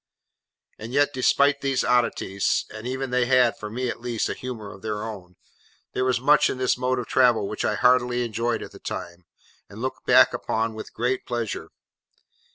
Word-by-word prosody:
And 115 +3 -7
yet 145 +1 +3
despite 140 +2 +3
these 135 -2 0
oddities—and 110 -2 0
even 130 0 -3
they 125 -1 +2
had, 125 -2 +4
for 105 - -7
me 125 +4 -3
at 115 - -4
least, 120 -2 -2
a - - -1
humour 115 -5 -7
of 95 - -14
their 105 -1 -3
own—there 100 +3 -8
was 130 -1 +1
much 150 +3 +4
in - - -3
this 130 -1 +1
mode 130 +1 -1
of 125 - -3
travelling 120 -6 +3
which 105 - -4
I 105 - +1
heartily 125 +1 +3
enjoyed 115 +1 -2
at - - -10
the - - -13
time, 85 0 -7 0.4
and 100 - -11
look 130 +2 -4
back - - +6
upon 110 0 -1
with 110 - -9
great 125 +3 -1
pleasure. 120 -3 -3
120 Hz, 180 wpm, -24 LUFS, 110-130 Hz, 0.4 s, back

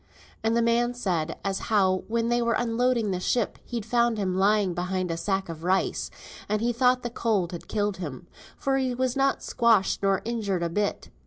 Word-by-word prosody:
And 225 +1 +2
the 235 - +3
man 240 +1 +2
said 170 -9 -1
as 195 -1 0
how 190 -4 +2
when 230 +1 0
they 240 0 +2
were 235 -1 +1
unloading 235 -2 +1
the 180 - -1
ship 230 +4 0
he'd 235 -4 -4
found 235 0 +2
him 190 -3 -1
lying 200 -1 +3
behind 180 0 -2
a 165 - -2
bag 195 -1 0
of 165 -1 -8
rice, 185 +2 0 0.4
and 210 0 +1
he 240 +2 0
thought 250 +1 +3
the 240 - -3
cold 210 -7 0
had 175 - -8
killed 205 -2 -1
him, 165 -3 -6 0.3
for 270 -1 0
he 260 -2 0
was 255 0 0
not 275 0 +1
squashed 230 -5 +2
nor 195 -1 +1
injured 210 -6 -1
a 170 - 0
bit. 205 +4 -2
215 Hz, 200 wpm, -26 LUFS, 185-235 Hz, 0.4 s, the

